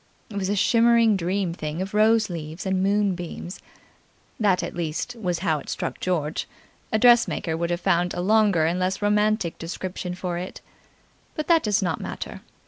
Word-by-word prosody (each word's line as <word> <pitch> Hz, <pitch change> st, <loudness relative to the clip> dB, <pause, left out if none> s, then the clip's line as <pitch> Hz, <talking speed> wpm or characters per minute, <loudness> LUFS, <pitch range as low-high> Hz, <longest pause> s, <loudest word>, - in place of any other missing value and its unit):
It -, -, -8 dB
was 190 Hz, -1 st, -1 dB
a 205 Hz, -, +1 dB
shimmering 230 Hz, +1 st, +4 dB
dream 185 Hz, 0 st, -1 dB
thing 155 Hz, -1 st, -5 dB
of 190 Hz, +2 st, -4 dB
rose 220 Hz, +1 st, +4 dB
leaves 165 Hz, 0 st, -6 dB
and 190 Hz, -1 st, 0 dB
moon 200 Hz, 0 st, +2 dB
beams. 175 Hz, +1 st, -7 dB, 0.8 s
That, 200 Hz, -4 st, +2 dB
at -, -, -4 dB
least, 170 Hz, +8 st, -3 dB
was 180 Hz, -7 st, -2 dB
how 160 Hz, -3 st, +2 dB
it -, -, -11 dB
struck -, -, -3 dB
George; 160 Hz, -4 st, -1 dB, 0.4 s
a 220 Hz, -, +3 dB
dressmaker 235 Hz, -8 st, +4 dB
would 170 Hz, +1 st, -2 dB
have 175 Hz, 0 st, -2 dB
found 175 Hz, -1 st, +1 dB
a -, -, -3 dB
longer 200 Hz, -4 st, +3 dB
and 170 Hz, +3 st, 0 dB
less 185 Hz, +2 st, -1 dB
romantic 210 Hz, -3 st, +1 dB
description 180 Hz, +1 st, -5 dB
for 180 Hz, -1 st, -3 dB
it. 180 Hz, -, -7 dB, 0.8 s
But 305 Hz, -, -2 dB
that 330 Hz, -1 st, +6 dB
does 210 Hz, -3 st, +1 dB
not 170 Hz, -4 st, -1 dB
matter. -, -, -6 dB
185 Hz, 180 wpm, -24 LUFS, 175-210 Hz, 0.8 s, that